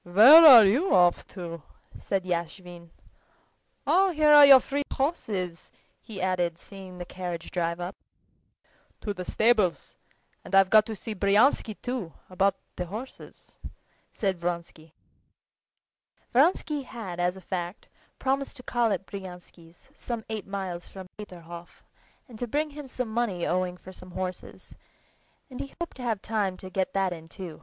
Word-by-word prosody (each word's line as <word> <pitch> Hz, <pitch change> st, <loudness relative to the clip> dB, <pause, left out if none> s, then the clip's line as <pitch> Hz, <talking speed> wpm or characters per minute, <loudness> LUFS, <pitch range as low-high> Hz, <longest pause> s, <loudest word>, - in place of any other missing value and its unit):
"Where 225 Hz, -, +8 dB
are 240 Hz, -7 st, +10 dB
you 265 Hz, -, +2 dB
off 175 Hz, -1 st, +3 dB
to?" 170 Hz, -3 st, -8 dB, 0.3 s
asked 195 Hz, -2 st, -3 dB
Yashvin. 175 Hz, 0 st, -5 dB, 1.0 s
"Oh, 385 Hz, +1 st, +3 dB
here 305 Hz, -3 st, +4 dB
are 290 Hz, -1 st, +9 dB
your 270 Hz, -1 st, +10 dB
three 280 Hz, +3 st, -3 dB
horses," 200 Hz, -, -3 dB, 0.3 s
he 215 Hz, -4 st, -10 dB
added, 180 Hz, -2 st, -1 dB
seeing 190 Hz, 0 st, -12 dB
the 175 Hz, -, -7 dB
carriage 175 Hz, -2 st, -7 dB
drive 170 Hz, -1 st, -2 dB
up. 175 Hz, +2 st, -5 dB, 1.1 s
"To 205 Hz, -, -3 dB
the 180 Hz, -2 st, -7 dB
stables, 215 Hz, -6 st, +1 dB, 0.5 s
and -, -, -3 dB
I've 195 Hz, -1 st, +5 dB
got 215 Hz, 0 st, +6 dB
to 220 Hz, -, -5 dB
see 220 Hz, +2 st, -6 dB
Bryansky, 210 Hz, +3 st, +2 dB
too, 245 Hz, -10 st, -4 dB, 0.2 s
about 195 Hz, +1 st, +1 dB, 0.2 s
the 180 Hz, -, -4 dB
horses," 225 Hz, +9 st, -10 dB, 0.5 s
said 190 Hz, -4 st, -2 dB
Vronsky. 170 Hz, -2 st, -5 dB, 1.4 s
Vronsky 295 Hz, +2 st, +2 dB
had 215 Hz, -9 st, -8 dB
as 180 Hz, +1 st, 0 dB
a -, -, -9 dB
fact 180 Hz, +1 st, -6 dB, 0.3 s
promised 275 Hz, +1 st, -2 dB
to 250 Hz, -, -12 dB
call 240 Hz, -3 st, 0 dB
at 190 Hz, -1 st, -2 dB
Bryansky's, 180 Hz, +1 st, -12 dB
some 235 Hz, -6 st, -6 dB
eight 215 Hz, -3 st, -5 dB
miles 190 Hz, -3 st, -5 dB
from 190 Hz, -1 st, -11 dB
Peterhof, 175 Hz, -4 st, -11 dB, 0.4 s
and 230 Hz, -4 st, -13 dB
to 245 Hz, -, -3 dB
bring 300 Hz, +5 st, -1 dB
him 290 Hz, -1 st, -9 dB
some 250 Hz, -2 st, -4 dB
money 210 Hz, -7 st, -1 dB
owing 180 Hz, 0 st, -1 dB
for 185 Hz, -, -13 dB
some 185 Hz, 0 st, -13 dB
horses; 185 Hz, 0 st, -7 dB, 0.8 s
and 250 Hz, -, -8 dB
he 275 Hz, -, -7 dB
hoped 340 Hz, -4 st, -6 dB
to -, -, -9 dB
have 225 Hz, -5 st, -2 dB
time 205 Hz, -4 st, -2 dB
to 185 Hz, 0 st, -11 dB
get 190 Hz, -1 st, -2 dB
that 195 Hz, -2 st, 0 dB
in 165 Hz, -1 st, -12 dB
too. 170 Hz, -3 st, -9 dB
195 Hz, 155 wpm, -26 LUFS, 175-240 Hz, 1.4 s, are